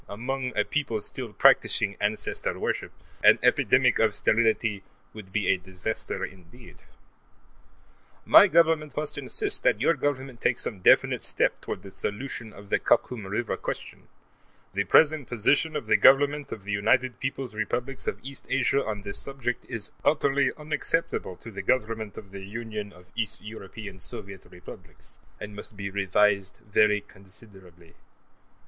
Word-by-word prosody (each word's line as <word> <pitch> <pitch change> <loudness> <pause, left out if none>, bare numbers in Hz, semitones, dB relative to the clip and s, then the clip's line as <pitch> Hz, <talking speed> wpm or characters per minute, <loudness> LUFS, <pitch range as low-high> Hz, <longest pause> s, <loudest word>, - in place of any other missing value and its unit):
Among 125 +3 -4
a 105 - +4
people 135 -7 -2
still 120 +2 -3
practicing 105 -3 +4
ancestor 105 +1 -1
worship, - - -3 0.3
an - - +7
epidemic - - +3
of - - +2
sterility 110 -2 +1 0.3
would 105 -4 -11
be 105 -1 -1
a 95 - +4
disaster 95 +4 -4
indeed. 95 +6 -15 1.5
My - - +8
Government 160 -2 +2
must 150 0 -2
insist 410 -2 +2
that - - +2
your - - +3
Government 135 -4 -3
take 120 - +2
some 105 - -1
definite 90 - +4
step - - 0
toward - - -5
the 95 - -10
solution 110 +2 -4
of 100 0 -14
the - - +3
Khakum 110 -6 +1
River 105 +4 -2
question; - - -7 0.7
the 100 +1 0
present 150 - +4
position 145 +7 +2
of 150 - -3
the - - +4
Government 145 +1 +4
of 105 - -7
the 105 - -5
United 125 +5 +1
Peoples' 135 -2 -4
Republics 125 +4 -3
of - - -1
East 135 +1 -6
Asia 135 +1 +2
on 105 -2 -4
this 100 0 -3
subject 130 -3 -4
is 105 -3 -2
utterly 140 -2 +2
unacceptable 150 - -1
to 115 - -11
the 100 -1 -6
Government 110 -1 -1
of 100 -3 -10
the 100 -1 -8
Union 105 0 -6
of 90 -2 -17
East 115 -3 -2
European 105 -2 -9
Soviet 95 +2 -6
Republics, 90 0 -12 0.2
and 105 0 -8
must 105 0 -7
be 100 0 -5
revised 100 0 +1
very 105 0 +3
considerably. 95 -4 -15
110 Hz, 150 wpm, -26 LUFS, 100-135 Hz, 1.5 s, My